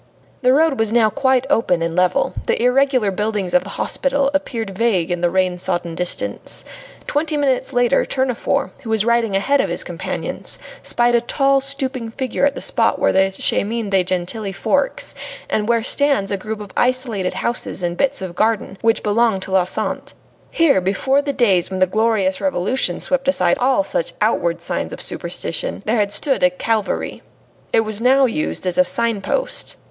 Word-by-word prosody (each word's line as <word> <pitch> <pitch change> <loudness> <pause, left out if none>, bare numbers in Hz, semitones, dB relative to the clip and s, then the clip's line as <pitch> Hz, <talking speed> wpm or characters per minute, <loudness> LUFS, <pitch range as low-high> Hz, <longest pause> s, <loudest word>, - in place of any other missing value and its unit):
The 255 -1 +4
road 295 -1 +3
was 225 -1 +1
now 225 -2 +3
quite 260 +3 +1
open 225 -11 +1
and 165 0 -2
level; 180 0 +1
the - - +1
irregular 250 -3 +2
buildings 205 -2 -2
of 270 - +4
the - - -9
hospital 275 0 0
appeared 235 -7 -2
vague 190 -6 +1
in 175 -1 -2
the 175 - +2
rain 185 0 0
sodden 175 -2 -2
distance. 180 +1 -3 0.4
Twenty 300 +1 -1
minutes 265 -3 0
later 245 +2 +2
Tournefort, 260 -2 -1
who 235 - -8
was 220 -1 +1
riding 235 -3 +1
ahead 275 +9 +2
of - - -2
his - - -2
companions, - - -2 0.2
spied 240 0 +2
a 235 - +4
tall, 275 +2 +2
stooping 265 -3 -3
figure 260 +3 0
at 285 - -3
the - - -6
spot - - +1
where - - +2
the 190 0 +3
Chemin 220 0 0
de 190 -2 +3
Gentilly 185 +3 -2
forks, - - -1 0.3
and 215 +1 -1
where 230 -1 +2
stands 275 -6 +2
a - - +1
group 215 +2 -6
of 205 -2 -9
isolated 245 -7 0
houses 235 -5 -2
and 175 0 -1
bits 275 0 0
of 180 -2 -5
garden, 215 -1 -1
which 225 0 +1
belong 220 -1 +2
to 190 - -6
la 190 -2 +3
Sante. 185 - -3 0.3
Here, 305 - +3
before 265 +9 +1
the 285 0 -2
days 210 -10 +2
when 190 - -4
the 185 - +5
glorious 205 -1 0
Revolution 205 -6 0
swept 270 -1 0
aside 180 -11 +2
all 265 +3 +2
such - - -2
outward - - 0
signs - - -3
of - - -7
superstition, - - -3
there 225 +2 +1
had 205 -1 +1
stood 270 +5 +3
a 180 - +5
Calvary. 215 +3 -2 0.5
It - - +4
was 215 -1 -3
now 265 +2 +4
used 260 -3 -2
as 180 -1 0
a - - +7
signpost. 230 - -1
225 Hz, 185 wpm, -19 LUFS, 190-265 Hz, 0.5 s, a